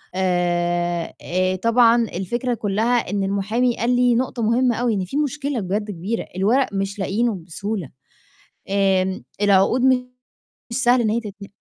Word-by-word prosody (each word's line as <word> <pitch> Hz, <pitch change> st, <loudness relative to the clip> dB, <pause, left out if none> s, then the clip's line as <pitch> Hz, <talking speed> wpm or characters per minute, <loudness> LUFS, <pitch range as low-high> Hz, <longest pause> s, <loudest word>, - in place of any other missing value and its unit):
آآ 175 Hz, -2 st, 0 dB
آآ، 185 Hz, +1 st, 0 dB
طبعًا 230 Hz, +3 st, +4 dB
الفكرة 235 Hz, +6 st, -2 dB
كلّها 225 Hz, +2 st, 0 dB
إن 200 Hz, 0 st, -1 dB
المحامي 210 Hz, +5 st, 0 dB
قال 245 Hz, +2 st, +1 dB
لي 245 Hz, -1 st, +3 dB
نقطة 250 Hz, 0 st, -1 dB
مهمّة 235 Hz, +2 st, +2 dB
أوي 240 Hz, 0 st, 0 dB
إن 190 Hz, -3 st, -1 dB
في 270 Hz, +11 st, -4 dB
مشكلة 290 Hz, -2 st, -1 dB
بجد 205 Hz, +2 st, -2 dB
كبيرة، 200 Hz, +5 st, -4 dB
الورق 225 Hz, +6 st, +1 dB
مش 195 Hz, +1 st, -3 dB
لاقيينه 215 Hz, +4 st, 0 dB
بسهولة، 185 Hz, 0 st, -5 dB, 0.8 s
آمم، 190 Hz, -1 st, +1 dB, 0.2 s
العقود 205 Hz, +5 st, +3 dB
مش 255 Hz, -1 st, +2 dB, 0.7 s
سهل 245 Hz, 0 st, +4 dB
إن 220 Hz, -, +1 dB
هي 225 Hz, +2 st, +1 dB
تتن 200 Hz, -3 st, -9 dB
210 Hz, 145 wpm, -21 LUFS, 190-240 Hz, 0.8 s, طبعًا